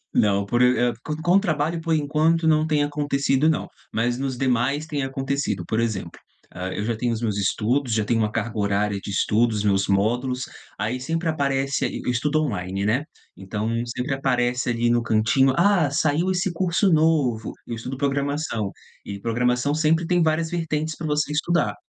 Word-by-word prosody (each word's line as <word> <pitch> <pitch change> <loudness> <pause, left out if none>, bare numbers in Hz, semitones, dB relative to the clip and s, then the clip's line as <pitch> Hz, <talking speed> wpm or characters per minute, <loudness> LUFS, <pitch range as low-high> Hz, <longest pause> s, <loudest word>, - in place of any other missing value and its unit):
Não, 100 -1 +3
por, 120 +4 +1
e 125 -1 +3
e, - - -7 0.3
com 175 +3 +4
trabalho 160 -2 -1
por 165 0 0
enquanto 155 +2 +1
não 155 0 +3
tem 150 -2 +2
acontecido 145 0 +1
não, 155 - 0 0.2
mas 120 +2 0
nos 135 -2 -2
demais 135 +4 0
tem 145 -3 -2
acontecido 135 -8 -2
por 110 +1 0
exemplo, 100 -7 -2 0.4
hã, 90 +1 -4
eu 105 - -3
já 115 0 -1
tenho 120 +1 -1
os 110 - -3
meus 105 -3 -1
estudos, 120 +6 0
já 110 -1 +1
tenho 115 +1 +1
uma 105 -1 +1
carga 115 0 -3
horária 100 0 0
de 100 - -7
estudos, 105 +2 +1
meus 100 -1 +2
módulos, 120 +6 +1 0.4
aí 125 +4 -2
sempre 165 +4 -2
aparece, 140 -3 0
e - - -4
estudo 150 +5 +1
online, 95 -7 -2
né, 125 +7 +1 0.3
então 105 +3 -3 0.2
sempre 125 +3 -2
aparece 125 -2 0
ali 120 0 +1
no 120 0 +2
cantinho, 115 +4 +3
"Ah 175 -5 +3
saiu 155 +5 +1
esse 185 0 0
curso 180 +2 +1
novo", 150 -8 +2
eu 115 - -4
estudo 130 +4 -6
programação, 140 -5 -1 0.3
e 100 -1 -7
programação 125 +5 0
sempre 160 +2 +2
tem 175 0 +2
várias 160 +1 +1
vertentes 160 -2 -2
para 165 - -5
você 150 0 0
estudar. 150 -8 0
135 Hz, 180 wpm, -23 LUFS, 115-155 Hz, 0.4 s, com